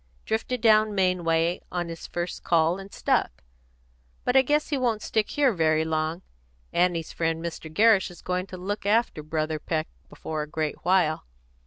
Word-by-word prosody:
Drifted 225 +2 -2
down 215 -2 +4
Maine 185 -2 +1
way 165 +1 +1
on 175 -1 -2
his 165 -1 -7
first 175 0 -4
call 170 +2 +2
and 195 +1 -10
stuck; - - 0 0.8
but 250 - 0
I 265 - +8
guess 295 +3 +1
he 290 - 0
won't 230 -4 0
stick 215 -2 0
here 280 -4 +2
very 160 -2 +2
long. 160 +2 -2 0.5
Annie's 175 -2 +1
friend 165 -1 -1
Mr. 165 -1 -6
Gerrish 210 +2 +4
is 175 - -14
going 180 +1 -2
to 185 - -8
look 200 +2 -4
after 220 -6 +2
Brother 155 0 -2
Peck 155 0 -2 0.2
before 155 -1 -5
a 150 - -6
great 155 -2 -3
while." 175 - +2
175 Hz, 175 wpm, -26 LUFS, 160-210 Hz, 0.8 s, I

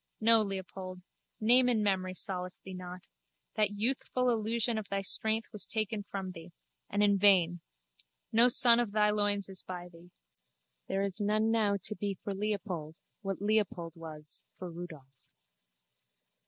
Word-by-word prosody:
No, 225 0 +6
Leopold. 190 -2 -6 0.4
Name 245 +3 +5
and 220 -3 +1
memory 185 -2 0
solace 180 -1 -4
thee 190 - -11
not. 180 0 -8 0.5
That 210 -2 +2
youthful 250 +4 0
illusion 225 0 0
of 205 - -9
thy 195 0 -1
strength 220 +3 +1
was 210 - -3
taken 215 -1 -2
from 190 -2 -5
thee—and 175 +4 -6
in 200 -1 +3
vain. 180 -4 +4 0.7
No 230 +2 +6
son 240 -2 +7
of 230 -4 -1
thy 210 -1 +3
loins 205 -1 +1
is 190 -1 0
by 180 -1 -8
thee. 170 0 -17 0.8
There 195 +1 -1
is 200 +1 -2
none 215 +2 +1
now 210 -3 +2
to 215 - -2
be 200 -1 -3
for 200 +2 -6
Leopold, 195 -6 -4 0.3
what 195 -1 -4
Leopold 205 -6 0
was 155 -2 -10 0.2
for 180 -2 -7
Rudolph. 155 -6 -11
200 Hz, 150 wpm, -31 LUFS, 180-215 Hz, 0.8 s, son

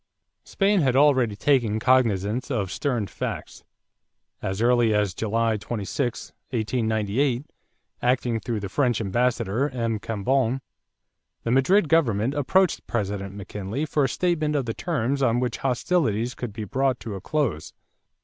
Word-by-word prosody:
= - - -55
Spain 200 -1 +2
had 130 -4 +2
already 130 -6 +4
taken 115 -3 +2
cognizance 115 -2 +2
of 100 -8 -1
stern 125 -3 -1
facts. 90 - -6 0.8
As 95 +1 -3
early 120 -2 +3
as 105 -3 +1
July 115 +1 0
26, 115 +4 -3 0.2
1898, 115 +2 0 0.6
acting 120 -2 +1
through 110 0 -3
the 100 - -3
French 120 +3 +1
ambassador, 120 +3 0
M. 115 -4 -2
Cambon, 120 +5 0 0.8
the 115 - -1
Madrid 155 +9 +4
government 130 -7 +2
approached 160 +6 +1
President 100 -3 -3
McKinley 105 +7 -4
for 145 -2 +1
a - - 0
statement 155 -1 0
of 140 -3 0
the 115 - -2
terms 140 -4 -1
on 120 -2 +3
which 125 -2 -1
hostilities 125 - 0
could 120 -2 -5
be 110 +1 -6
brought 130 +5 0
to 110 - -5
a 95 - -6
close. 140 - -1
120 Hz, 140 wpm, -25 LUFS, 105-135 Hz, 0.8 s, already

